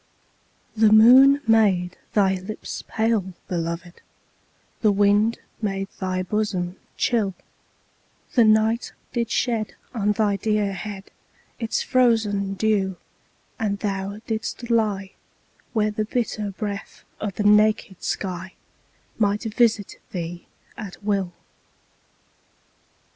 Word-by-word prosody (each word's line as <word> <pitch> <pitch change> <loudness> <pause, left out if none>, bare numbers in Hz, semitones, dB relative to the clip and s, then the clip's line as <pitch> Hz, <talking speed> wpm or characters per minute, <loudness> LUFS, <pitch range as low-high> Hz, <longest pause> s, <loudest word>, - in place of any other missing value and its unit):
4. 220 - +6
The 210 - +5
moon 260 +6 +8
made 190 -5 +3 0.2
thy 195 -2 +4
lips 190 +3 -6
pale, 220 -5 0
beloved 170 -1 -4 0.8
The 215 - +4
wind 205 +3 +3 0.2
made 195 -2 -2
thy 185 -1 -1
bosom 185 -2 -2 0.2
chill 210 -6 +1 1.0
_20 - - -26
The 240 - +5
night 220 +2 +3 0.2
did 235 -2 -1
shed 230 -4 -1 0.2
on 210 -3 +1
thy 205 -2 +1
dear 210 -1 0
head 195 +1 -7 0.5
Its 225 -1 -1
frozen 220 -6 +2
dew, 195 -2 +1 0.6
and 205 -2 0
thou 200 0 -3
didst 230 +2 -4
lie 205 -4 +1 0.6
Where 215 -2 +1
the 215 +1 -2
bitter 215 -2 -2
breath 200 0 -6 0.2
of 205 -3 -4
the 210 - -1
naked 210 -2 +3
sky 185 -1 -4 0.6
Might 205 0 +1
visit 220 -2 +1
thee 175 -2 -5 0.3
at 205 -2 -9
will. 200 -3 0
210 Hz, 110 wpm, -23 LUFS, 195-220 Hz, 1.0 s, moon